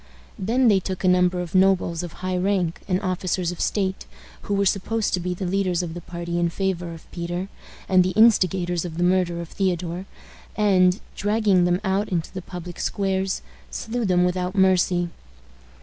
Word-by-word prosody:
Then 235 Hz, +6 st, +2 dB
they 200 Hz, -3 st, +5 dB
took 190 Hz, 0 st, -5 dB
a -, -, +3 dB
number 180 Hz, 0 st, +3 dB
of 175 Hz, -2 st, -7 dB
nobles 185 Hz, -3 st, +3 dB
of 175 Hz, -2 st, -6 dB
high 185 Hz, 0 st, 0 dB
rank, 180 Hz, -3 st, 0 dB
and 185 Hz, -1 st, +1 dB
officers 185 Hz, -1 st, -1 dB
of 180 Hz, -, -7 dB
state, 190 Hz, -2 st, -1 dB, 0.3 s
who 205 Hz, -, -2 dB
were 200 Hz, 0 st, +2 dB
supposed 210 Hz, +3 st, 0 dB
to 180 Hz, -, +2 dB
be 180 Hz, +1 st, -3 dB
the 190 Hz, -, -4 dB
leaders 185 Hz, -1 st, 0 dB
of 165 Hz, -2 st, -5 dB
the 175 Hz, -, -7 dB
party 170 Hz, 0 st, -4 dB
in 170 Hz, 0 st, +2 dB
favor 180 Hz, -1 st, -2 dB
of 165 Hz, -, -16 dB
Peter, 175 Hz, +2 st, -4 dB, 0.4 s
and 185 Hz, -1 st, +5 dB
the 185 Hz, -, 0 dB
instigators 185 Hz, -6 st, +3 dB
of 165 Hz, -2 st, -6 dB
the 175 Hz, -, +1 dB
murder 180 Hz, -1 st, +2 dB
of 170 Hz, -, -8 dB
Theodore, 180 Hz, -1 st, -2 dB, 0.5 s
and, 190 Hz, -3 st, +3 dB, 0.2 s
dragging 205 Hz, -3 st, +2 dB
them 175 Hz, 0 st, +2 dB
out 195 Hz, +2 st, 0 dB
into 170 Hz, -3 st, -2 dB
the 185 Hz, -, -5 dB
public 175 Hz, -1 st, -8 dB
squares, 195 Hz, -1 st, -1 dB, 0.3 s
slew 235 Hz, +1 st, -3 dB
them 180 Hz, -3 st, +3 dB
without 180 Hz, +1 st, -1 dB
mercy. 180 Hz, -2 st, +3 dB
185 Hz, 180 wpm, -23 LUFS, 175-195 Hz, 0.5 s, they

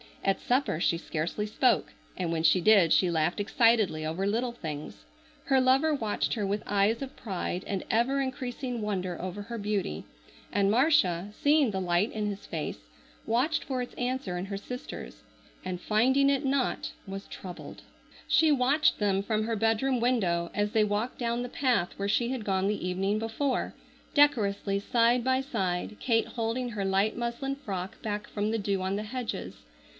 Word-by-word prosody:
At 195 Hz, 0 st, +1 dB
supper 250 Hz, -, +1 dB
she 170 Hz, -, +2 dB
scarcely 165 Hz, +5 st, -3 dB
spoke, 210 Hz, -, +2 dB, 0.2 s
and 175 Hz, -2 st, -1 dB
when 165 Hz, -1 st, 0 dB
she 165 Hz, +3 st, +5 dB
did 195 Hz, -5 st, +6 dB
she 185 Hz, -, +4 dB
laughed 165 Hz, +4 st, 0 dB
excitedly 215 Hz, -6 st, +3 dB
over 165 Hz, +5 st, -2 dB
little 235 Hz, +5 st, 0 dB
things. 150 Hz, -, -7 dB, 0.4 s
Her 265 Hz, -1 st, +4 dB
lover 270 Hz, +5 st, +4 dB
watched 220 Hz, -7 st, -1 dB
her 210 Hz, -3 st, -1 dB
with 205 Hz, +2 st, -1 dB
eyes 205 Hz, +4 st, +2 dB
of 270 Hz, -, -8 dB
pride 185 Hz, -3 st, -4 dB
and 195 Hz, -2 st, -2 dB
ever 250 Hz, +5 st, +2 dB
increasing 255 Hz, -2 st, -3 dB
wonder 185 Hz, -4 st, -2 dB
over 185 Hz, +3 st, -5 dB
her 235 Hz, +3 st, -6 dB
beauty, 200 Hz, -, -2 dB, 0.5 s
and 200 Hz, -1 st, +2 dB
Marcia, 230 Hz, -, +3 dB
seeing 290 Hz, 0 st, +3 dB
the 190 Hz, -2 st, -2 dB
light 180 Hz, +4 st, +1 dB
in 215 Hz, -1 st, -2 dB
his 200 Hz, -1 st, -5 dB
face, 155 Hz, -, -4 dB, 0.5 s
watched 250 Hz, +8 st, +1 dB
for 260 Hz, -2 st, -2 dB
its 245 Hz, -, -6 dB
answer 245 Hz, -7 st, -2 dB
in 180 Hz, -, -3 dB
her 200 Hz, 0 st, -4 dB
sister's, 200 Hz, -, -8 dB, 0.4 s
and 180 Hz, -1 st, -4 dB
finding 260 Hz, +6 st, +3 dB
it 280 Hz, 0 st, +1 dB
not 270 Hz, -1 st, 0 dB, 0.2 s
was 195 Hz, +1 st, -6 dB
troubled. 180 Hz, -2 st, -9 dB, 0.5 s
She 320 Hz, -1 st, +4 dB
watched 285 Hz, +2 st, +3 dB
them 195 Hz, -2 st, +1 dB
from 215 Hz, +1 st, 0 dB
her 230 Hz, 0 st, -1 dB
bedroom 225 Hz, +4 st, +1 dB
window 185 Hz, -9 st, +1 dB
as 205 Hz, 0 st, 0 dB
they 220 Hz, -1 st, +3 dB
walked 210 Hz, +4 st, -1 dB
down 235 Hz, 0 st, -1 dB
the 245 Hz, -, -5 dB
path 250 Hz, -10 st, +1 dB
where 200 Hz, 0 st, -2 dB
she 235 Hz, +3 st, +2 dB
had 250 Hz, -4 st, -3 dB
gone 190 Hz, -1 st, +1 dB
the 205 Hz, -3 st, -1 dB
evening 195 Hz, +3 st, 0 dB
before, 225 Hz, +5 st, -1 dB, 0.4 s
decorously 205 Hz, -9 st, +3 dB
side 235 Hz, +3 st, +2 dB
by 260 Hz, +1 st, +2 dB
side, 190 Hz, -6 st, -2 dB
Kate 225 Hz, -2 st, +1 dB
holding 235 Hz, +2 st, -2 dB
her 205 Hz, -4 st, -3 dB
light 195 Hz, +3 st, +1 dB
muslin 240 Hz, +3 st, -2 dB
frock 195 Hz, -9 st, -6 dB
back 210 Hz, -1 st, -3 dB
from 210 Hz, 0 st, -2 dB
the 225 Hz, 0 st, 0 dB
dew 200 Hz, -2 st, -1 dB
on 190 Hz, +1 st, -1 dB
the 210 Hz, -, -2 dB
hedges. 245 Hz, +2 st, -5 dB
215 Hz, 175 wpm, -29 LUFS, 195-250 Hz, 0.5 s, did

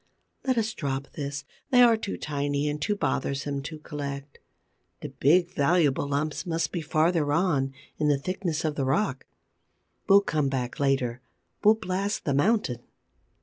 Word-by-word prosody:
Let 260 Hz, -2 st, +1 dB
us 225 Hz, 0 st, 0 dB
drop 135 Hz, -2 st, -3 dB
this: 145 Hz, -1 st, -5 dB, 0.2 s
they 250 Hz, -1 st, +6 dB
are 235 Hz, -1 st, +6 dB
too 220 Hz, -2 st, -4 dB
tiny 145 Hz, 0 st, -1 dB
and 150 Hz, 0 st, -2 dB
too 210 Hz, +4 st, 0 dB
bothersome 140 Hz, -3 st, -1 dB
to 155 Hz, +3 st, -7 dB
collect. 140 Hz, -2 st, -6 dB, 0.6 s
The -, -, -5 dB
big, 170 Hz, +5 st, +3 dB
valuable 145 Hz, -2 st, +2 dB
lumps 145 Hz, +2 st, -1 dB
must 165 Hz, -4 st, -1 dB
be 175 Hz, -, -2 dB
farther 155 Hz, 0 st, +1 dB
on, 145 Hz, -5 st, +1 dB, 0.3 s
in 150 Hz, -, +2 dB
the 145 Hz, -1 st, +3 dB
thickness 175 Hz, 0 st, -2 dB
of 155 Hz, -, 0 dB
the 140 Hz, -2 st, -1 dB
rock. 135 Hz, 0 st, 0 dB, 0.8 s
We'll 200 Hz, +1 st, +8 dB
come 150 Hz, -7 st, 0 dB
back 125 Hz, -2 st, -3 dB
later; 135 Hz, -3 st, +1 dB, 0.4 s
we'll 215 Hz, +1 st, +7 dB
blast 200 Hz, 0 st, -2 dB
the 140 Hz, -, +1 dB
mountain. 145 Hz, -, +2 dB
150 Hz, 155 wpm, -27 LUFS, 140-180 Hz, 0.8 s, We'll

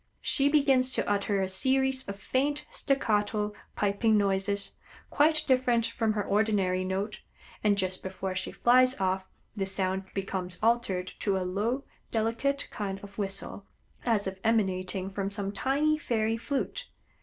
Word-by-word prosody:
She 280 Hz, 0 st, +2 dB
begins 270 Hz, -4 st, +4 dB
to -, -, 0 dB
utter 200 Hz, -1 st, +1 dB
a -, -, 0 dB
series 265 Hz, +7 st, +1 dB
of 200 Hz, -, -3 dB
faint, 275 Hz, +8 st, -1 dB
staccato, 210 Hz, -5 st, +1 dB, 0.2 s
piping 210 Hz, +2 st, +2 dB
noises, 200 Hz, 0 st, 0 dB, 0.4 s
quite 310 Hz, +1 st, +3 dB
different 255 Hz, -3 st, +3 dB
from 225 Hz, -2 st, 0 dB
her 210 Hz, -1 st, -1 dB
ordinary 200 Hz, -3 st, +1 dB
note, 195 Hz, +3 st, -2 dB, 0.4 s
and 205 Hz, -1 st, +3 dB
just 185 Hz, -1 st, -1 dB
before 190 Hz, 0 st, -4 dB
she 185 Hz, 0 st, -3 dB
flies 255 Hz, +2 st, +4 dB
off 190 Hz, 0 st, 0 dB, 0.3 s
this 195 Hz, -2 st, -1 dB
sound 190 Hz, 0 st, 0 dB
becomes 185 Hz, -2 st, -3 dB
altered 220 Hz, -6 st, +1 dB
to 200 Hz, -2 st, +1 dB
a 185 Hz, -, -2 dB
low, 215 Hz, +9 st, -1 dB, 0.3 s
delicate 230 Hz, +5 st, 0 dB
kind 195 Hz, -2 st, -4 dB
of 200 Hz, +1 st, -10 dB
whistle, 195 Hz, 0 st, -4 dB, 0.4 s
as 225 Hz, -4 st, +1 dB
if 190 Hz, 0 st, -4 dB
emanating 190 Hz, -3 st, 0 dB
from 195 Hz, 0 st, -2 dB
some 200 Hz, 0 st, -3 dB
tiny 295 Hz, +7 st, +1 dB
fairy 225 Hz, -4 st, 0 dB
flute. 280 Hz, -, -3 dB
205 Hz, 145 wpm, -29 LUFS, 190-250 Hz, 0.4 s, begins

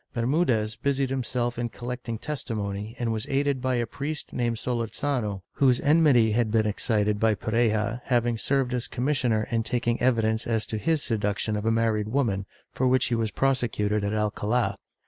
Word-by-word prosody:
Bermudez 120 Hz, -4 st, +1 dB
busied 135 Hz, +1 st, 0 dB
himself 120 Hz, -2 st, -2 dB
in 120 Hz, 0 st, -1 dB
collecting 120 Hz, -1 st, -5 dB
testimony 110 Hz, -6 st, -4 dB
and 115 Hz, -2 st, -1 dB
was 110 Hz, -1 st, -3 dB
aided 140 Hz, -1 st, +1 dB
by 130 Hz, 0 st, 0 dB
a 120 Hz, -1 st, 0 dB
priest 145 Hz, +6 st, -5 dB
named 120 Hz, -1 st, 0 dB
Solorzano, 115 Hz, -3 st, -2 dB
whose 130 Hz, -3 st, +3 dB
enmity 145 Hz, -7 st, +4 dB
had 115 Hz, 0 st, +1 dB
been 110 Hz, 0 st, +2 dB
excited 105 Hz, -1 st, +1 dB
by 110 Hz, -1 st, +3 dB
Pareja 110 Hz, +1 st, 0 dB
having 120 Hz, -2 st, +1 dB
served 135 Hz, -1 st, +1 dB
as 125 Hz, -1 st, -1 dB
commissioner 125 Hz, -4 st, 0 dB
in 115 Hz, -1 st, +2 dB
taking 120 Hz, 0 st, -1 dB
evidence 115 Hz, -2 st, +1 dB
as 110 Hz, -2 st, 0 dB
to 110 Hz, -, -4 dB
his 155 Hz, +7 st, +1 dB
seduction 105 Hz, -1 st, -1 dB
of 105 Hz, +1 st, -2 dB
a -, -, +4 dB
married 110 Hz, -2 st, +1 dB
woman, 110 Hz, -6 st, 0 dB, 0.3 s
for 130 Hz, -, +1 dB
which 130 Hz, 0 st, +3 dB
he -, -, -1 dB
was 115 Hz, -1 st, 0 dB
prosecuted 110 Hz, -6 st, 0 dB
in 100 Hz, -, -1 dB
AlcaUi. 105 Hz, +1 st, 0 dB
115 Hz, 170 wpm, -26 LUFS, 110-130 Hz, 0.3 s, enmity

